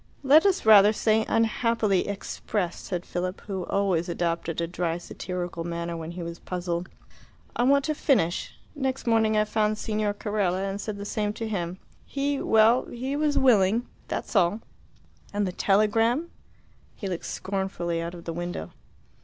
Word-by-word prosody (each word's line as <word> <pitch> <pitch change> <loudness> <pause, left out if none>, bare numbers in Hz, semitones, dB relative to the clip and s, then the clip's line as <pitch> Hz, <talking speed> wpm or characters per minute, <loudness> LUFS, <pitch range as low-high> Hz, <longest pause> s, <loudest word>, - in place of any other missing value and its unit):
"Let 300 +7 +6
us 380 - +1
rather 210 -1 +8
say 220 0 +2
unhappily 225 -3 +1
expressed," 200 -2 -3
said 175 -2 -3
Philip, 180 +2 -3
who 190 -3 -4
always 190 -3 +1
adopted 170 -1 -2
a 170 - +1
dry 170 -1 -2
satirical 175 -1 -5
manner 170 0 -3
when 165 -1 -6
he 170 0 -6
was 170 0 -6
puzzled. 175 -1 -3 0.7
"I - - 0
want 280 +1 +4
to 310 - 0
finish. 205 - +1 0.2
Next 265 -2 -2
morning 220 -2 +3
I 215 - +4
found 215 0 +1
Signor 210 -1 -1
Carella 200 -3 -1
and 195 +1 -4
said 215 -2 -4
the 200 - -6
same 210 0 -1
to 225 +1 -4
him. 180 -4 -3 0.3
He 280 0 -2
well, 225 +3 +4
he 260 +4 -4
was 295 0 +1
willing. 230 -2 +4 0.2
That's - - -4
all." 195 +3 +3 0.7
"And 205 0 +1
the 185 - -2
telegram?" 225 - +2 0.6
He 200 - -5
looked 180 -3 -4
scornfully 190 -4 -2
out 170 +1 -5
of 170 - -10
the 165 - -3
window. 175 - -5
200 Hz, 160 wpm, -26 LUFS, 175-225 Hz, 0.7 s, rather